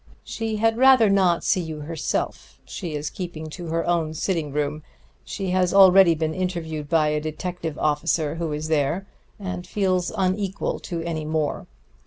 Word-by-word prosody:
She 225 -1 -3
had 225 +2 +1
rather 260 -5 +6
not 185 -4 +3
see 185 - +2
you 160 -2 -6
herself; 160 +1 -4
she 170 -6 -5
is 150 +1 -3
keeping 165 -4 -6
to 175 +1 -7
her 165 +1 -1
own 165 -2 0
sitting 160 -3 -1
room. 150 +1 -2 0.4
She 190 -2 -4
has 185 0 +1
already 190 -3 +7
been 160 0 -1
interviewed 160 -5 -3
by 155 -2 +3
a 150 0 0
detective 160 +1 -4
officer 150 0 0
who 165 -1 -3
is 150 +1 -3
there, 155 +4 0 0.3
and 185 -2 -5
feels 185 -3 0
unequal 190 +1 -1
to 170 -2 -5
any 165 -2 -3
more. 155 -1 -2
170 Hz, 165 wpm, -24 LUFS, 155-185 Hz, 0.4 s, already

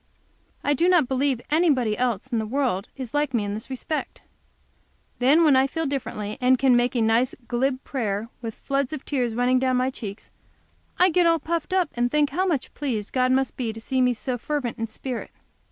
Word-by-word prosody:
I 290 - +2
do 340 +6 +2
not 345 -8 +4
believe 265 -1 +1
anybody 285 -9 +3
else 245 -4 -1
in 230 - +1
the 220 - -2
world 240 -6 -1
is 255 -4 -6
like 290 -3 0
me 220 - +1
in 205 0 -3
this 215 +4 -6
respect. 295 +4 -4 1.0
Then 280 +7 +5
when 300 -4 +5
I 265 +1 +4
feel 325 +3 -3
differently, 215 -7 -4
and 255 +1 +4
can 260 -1 +4
make 245 +1 +2
a 235 - +2
nice, 230 +3 +2
glib 260 +2 0
prayer, 220 -5 -2
with 225 -2 -5
floods 275 0 -2
of 300 - -6
tears 245 -5 -1
running 250 +1 +3
down 255 -1 +1
my 255 +1 +1
cheeks, 210 -5 -8 0.7
I 365 +1 +5
get 350 +1 +4
all 330 0 +4
puffed 330 +3 -3
up, 370 -4 +1
and 240 0 0
think 295 0 +2
how 370 +6 0
much 300 -8 -1
pleased 235 -8 -3
God 255 -1 +2
must 265 0 +1
be 235 -3 -2
to 220 - -8
see 260 +3 -1
me 250 -1 +3
so 245 +2 -3
fervent 275 -4 -3
in 225 - -2
spirit. 245 +2 -5
255 Hz, 210 wpm, -24 LUFS, 235-290 Hz, 1.0 s, Then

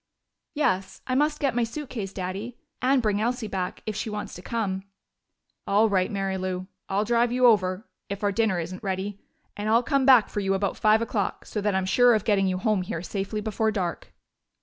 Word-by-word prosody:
"Yes, 190 -10 0
I 255 - -2
must 300 +3 +2
get 275 -4 +1
my 240 0 +1
suitcase, 230 -5 -5
Daddy. 195 +6 -5 0.2
And 255 0 +3
bring 210 -1 +1
Elsie 240 +1 -1
back, 185 -3 -4
if 215 - -3
she 220 - -3
wants 210 0 -5
to 180 - -9
come." 195 -3 -2 0.9
"All 215 +3 +4
right, 185 -2 +2
Mary 195 -2 -2
Lou. 185 0 -3 0.2
I'll 195 +2 +1
drive 235 +1 +2
you 250 +1 +3
over, 200 -2 +3 0.2
if 200 +1 -5
our 205 - +2
dinner 200 -3 +1
isn't 180 +3 -5
ready. 195 0 -3 0.4
And 205 +1 -3
I'll 230 +2 +4
come 275 0 +1
back 255 -5 +7
for - - -4
you 195 -1 +1
about 195 0 -1
five 215 +1 +3
o'clock, 215 -3 -2
so 210 - -4
that 205 -1 +1
I'm 190 -1 +1
sure 245 +5 +5
of 215 - 0
getting 195 -3 +3
you 185 -1 0
home 210 0 +1
here 180 -3 -4
safely 200 +3 -3
before 220 +1 0
dark." 185 -5 -3
210 Hz, 205 wpm, -26 LUFS, 190-230 Hz, 0.9 s, back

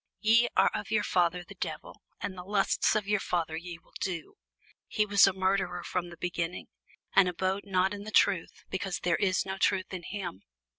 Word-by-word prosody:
Ye 230 +2 +5
are - - +5
of - - -4
your 215 -1 +2
father 175 0 +1
the 190 - -12
devil, 160 -5 -6 0.2
and 190 - -4
the 180 - -7
lusts 200 +2 +2
of 210 -2 0
your 205 0 +2
father 170 -4 -1
ye 170 +1 -6
will - - -28
do. 170 -4 -4 0.5
He 210 - +1
was 200 -1 +6
a - - +3
murderer 185 -2 0
from 175 0 -3
the 170 - -11
beginning, 175 0 -3 0.5
and 185 -2 +6
abode 190 +3 -1
not 190 0 +1
in 200 0 -6
the 215 - -7
truth, 195 -4 +2
because 190 -1 -3
there 175 -1 +2
is 190 -2 +1
no 190 0 -4
truth 190 0 +1
in 185 - -4
him. 175 - -6
185 Hz, 200 wpm, -29 LUFS, 175-200 Hz, 0.5 s, was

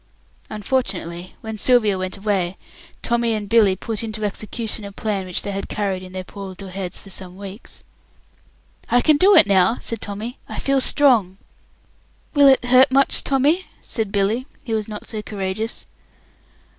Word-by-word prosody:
Unfortunately, 195 -6 -3
when 220 -1 -6
Sylvia 230 -5 +3
went 185 +1 -4
away, 195 -3 -1 0.5
Tommy 235 -1 +1
and 210 -1 -4
Billy 205 -3 +4
put 215 +3 -5
into 215 -1 -3
execution 215 +2 -3
a 200 - -7
plan 200 -2 -3
which 180 - -1
they 200 - -3
had 195 0 -5
carried 195 -3 -2
in 185 0 -10
their 185 0 -5
poor 195 +1 -9
little 190 +1 -9
heads 185 -1 -5
for 195 - -13
some 185 -1 -8
weeks. 200 +3 -9 1.1
"I 245 - +4
can 305 +1 +4
do 385 +6 +6
it - - +8
now," 200 +3 +3
said 230 -2 -6
Tommy. 215 +5 -6
"I - - -6
feel 275 -1 +1
strong." 235 -11 +4 1.0
"Will 285 -1 +6
it 265 -2 +5
hurt 255 +2 +6
much, 275 +1 +4
Tommy?" 290 +7 +1 0.2
said 220 -5 -3
Billy, 215 +6 0 0.2
who 230 - -3
was 215 -1 -1
not 210 -1 -7
so 215 -2 -4
courageous. 205 +2 -4
210 Hz, 170 wpm, -21 LUFS, 195-240 Hz, 1.1 s, it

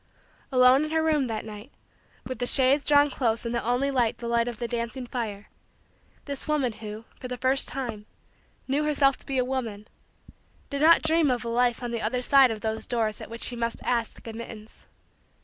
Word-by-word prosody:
Alone 255 +2 +5
in - - -5
her 320 0 +1
room 305 -4 +2
that 220 -2 -4
night, 215 +4 -10 0.5
with 255 -3 -6
the 245 - 0
shades 270 +2 +4
drawn 290 -1 +5
close 230 -3 -1
and 235 - -2
the 235 - -1
only 245 +4 +1
light 245 -4 +1
the 235 - -6
light 235 0 +1
of 240 -2 -4
the 235 - -3
dancing 235 +2 -4
fire, 215 -5 -5 0.8
this 280 0 -5
woman 285 -6 0
who, 215 +1 -8
for 255 - -6
the 250 0 -5
first 260 +3 +1
time, 230 -6 -5 0.6
knew 280 +3 +1
herself 280 -2 +3
to - - -16
be 270 -2 -1
a 250 - +2
woman, 230 -5 -4 0.8
did 280 0 -2
not 330 +2 +6
dream 320 -1 +3
of 245 -2 -1
a - - -2
life 240 +1 +1
on 240 - -3
the 235 -1 -2
other 250 +3 -1
side 270 0 +6
of 220 -2 -4
those 220 0 -3
doors 220 -3 -1
at - - -8
which 230 +1 -5
she 245 - +1
must 235 0 -2
ask 235 -2 -2
admittance. 225 -1 -9
245 Hz, 205 wpm, -26 LUFS, 230-275 Hz, 0.8 s, not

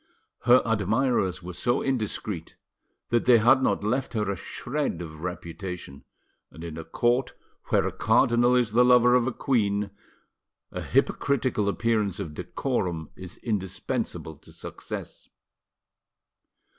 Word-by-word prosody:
Her 125 +1 +6
admirers 110 -3 +1
were 90 +1 -6
so 120 +7 0
indiscreet 110 -8 -3 0.5
that 120 -1 +1
they 125 -1 +7
had 120 +4 +5
not 100 -6 +1
left 125 +6 -1
her 105 -3 0
a - - -2
shred 125 - -3
of 80 -3 -8
reputation, 90 -4 -6 0.4
and 80 +4 -11
in 85 -2 -6
a 80 - -6
court 120 +8 0 0.3
where - - +2
a - - -1
cardinal 120 +1 +3
is 120 -3 +2
the 120 +3 +5
lover 125 0 +6
of 125 0 +3
a - - +1
queen, 105 -6 0 0.8
a - - -5
hypocritical 125 -6 +1
appearance 105 -3 0
of 75 - -5
decorum 90 - -3
is 90 -2 -10
indispensable 95 -6 -3
to - - -17
success. - - -8
110 Hz, 130 wpm, -26 LUFS, 90-125 Hz, 0.8 s, they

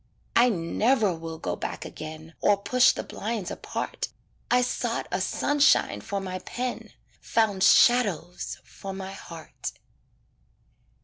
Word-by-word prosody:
I 245 +2 +6
never 210 +3 +2
will 165 0 -6
go 90 - -3
back - - -5
again 155 +1 -8
Or 205 - +4
push 245 +6 +4
the - - -4
blinds 215 -3 -4
apart - - -4 0.4
I 250 0 +4
sought 245 -1 -2
a 180 +1 0
sunshine 290 +9 +3
for 200 -2 -3
my 185 -1 -4
pen, 245 +6 -4 0.3
Found 215 -4 +1
shadows 200 - +4
for 195 +9 -8
my 190 0 -6
heart. 165 -4 -8
195 Hz, 125 wpm, -27 LUFS, 170-240 Hz, 0.4 s, I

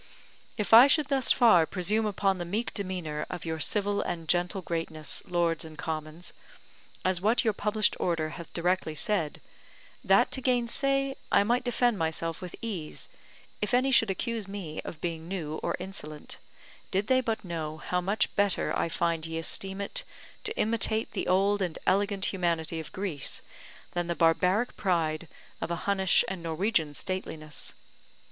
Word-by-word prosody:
If 210 0 -1
I 240 +4 +11
should 295 0 +3
thus 270 -3 +3
far 180 -10 +6
presume 210 +4 +1
upon 195 -2 0
the - - -2
meek 210 +7 -2
demeanour 180 -7 -3
of 175 -2 -6
your 160 -1 -3
civil 205 +5 +2
and 165 -2 -4
gentle 180 +3 0
greatness, 160 -2 -2
Lords 170 -2 +1
and 160 -1 -10
Commons, 155 +2 -5 0.7
as 185 -1 +1
what 220 +5 +3
your 220 -3 +2
published 210 +1 +1
Order 165 -3 0
hath 165 +1 -9
directly 175 -2 0
said, 165 -2 0 0.6
that - - +4
to 265 - +1
gainsay, 270 +2 +1 0.2
I 200 - +5
might 240 +4 +1
defend 245 -3 +1
myself 165 0 -1
with 180 -1 -7
ease, 185 -9 -5 0.5
if 210 +4 +1
any 260 +2 +3
should 225 -4 +5
accuse 225 +2 -2
me 195 -6 -6
of 155 - -8
being 165 -1 -4
new 160 -5 -4
or - - -1
insolent, 175 -5 -6 0.5
did 195 +2 0
they 260 +3 +3
but 225 -4 -2
know 160 -3 -4
how 180 +3 -1
much 200 +4 0
better 200 -2 +1
I - - 0
find 165 -1 0
ye 165 0 -4
esteem 190 +4 -1
it - - +1 0.4
to 435 - -1
imitate 220 0 +2
the - - -3
old 200 +2 +3
and 175 -4 -2
elegant 200 0 +1
humanity 170 -3 -1
of 160 - -8
Greece, 185 -8 -4 0.5
than 175 -1 -2
the 170 - -1
barbaric 180 +8 +2
pride 165 -3 0 0.3
of - - -2
a 170 - 0
Hunnish 190 -2 +3
and 190 -2 -4
Norwegian 165 -2 0
stateliness. 155 -4 -2
185 Hz, 165 wpm, -28 LUFS, 165-210 Hz, 0.7 s, I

